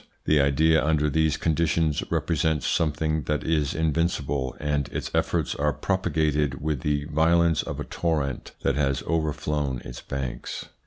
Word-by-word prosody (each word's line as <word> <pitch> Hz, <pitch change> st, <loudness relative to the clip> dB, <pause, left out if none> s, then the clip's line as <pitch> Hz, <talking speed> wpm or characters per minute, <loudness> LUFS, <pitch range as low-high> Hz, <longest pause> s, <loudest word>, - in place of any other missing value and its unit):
The 75 Hz, -2 st, +4 dB
idea 80 Hz, +3 st, +3 dB
under 75 Hz, -1 st, +2 dB
these 80 Hz, 0 st, +2 dB
con 80 Hz, -, +1 dB
ditions 80 Hz, -1 st, +1 dB
represents 80 Hz, -3 st, 0 dB
something 75 Hz, -1 st, 0 dB
that 75 Hz, +2 st, -1 dB
is 75 Hz, -4 st, 0 dB
invincible, 75 Hz, -4 st, 0 dB
and 75 Hz, -2 st, -1 dB
its -, -, -4 dB
efforts -, -, 0 dB
are 75 Hz, 0 st, 0 dB
propagated 75 Hz, -6 st, 0 dB
with 75 Hz, -2 st, -1 dB
the 75 Hz, -1 st, 0 dB
violence 80 Hz, +1 st, +3 dB
of -, -, -6 dB
a -, -, -2 dB
torrent 75 Hz, -6 st, -2 dB
that 70 Hz, -, +2 dB
has 70 Hz, -2 st, 0 dB
overflown 75 Hz, -4 st, -1 dB
its 60 Hz, -1 st, -8 dB
banks. 65 Hz, -3 st, -5 dB
75 Hz, 150 wpm, -25 LUFS, 70-80 Hz, -, The